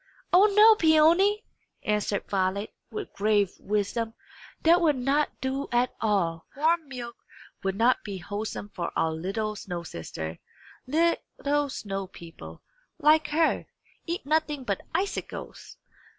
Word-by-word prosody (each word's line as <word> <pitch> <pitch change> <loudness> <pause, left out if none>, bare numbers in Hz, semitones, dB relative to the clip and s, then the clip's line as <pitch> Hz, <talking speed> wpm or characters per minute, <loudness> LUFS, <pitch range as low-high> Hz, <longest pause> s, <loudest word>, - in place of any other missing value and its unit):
"O 380 +4 +7
no, 425 +2 +7
Peony!" 340 +6 +4 0.4
answered 210 -1 -1
Violet, 195 +2 -1 0.2
with 425 -1 -6
grave 205 -2 +2
wisdom. 210 +3 -2 0.5
"That 340 +2 +5
will 310 -4 +3
not 275 +4 +1
do 265 +1 -2
at 245 +1 +2
all. 175 -7 0
Warm 320 +1 +2
milk 240 -3 -7 0.4
will 195 0 -1
not 235 +4 +3
be 200 -2 -5
wholesome 205 +2 -5
for 175 -4 -4
our 160 - +1
little 200 +7 -3
snow 175 -4 -5
sister. 80 - -6 0.5
Little 290 -2 0
snow 195 -6 -4
people, 170 -2 -12 0.3
like 310 -1 +4
her, 315 +2 +1 0.4
eat 340 -2 -3
nothing 300 -2 0
but 200 -5 -2
icicles. 390 +3 -4
240 Hz, 125 wpm, -27 LUFS, 200-315 Hz, 0.5 s, O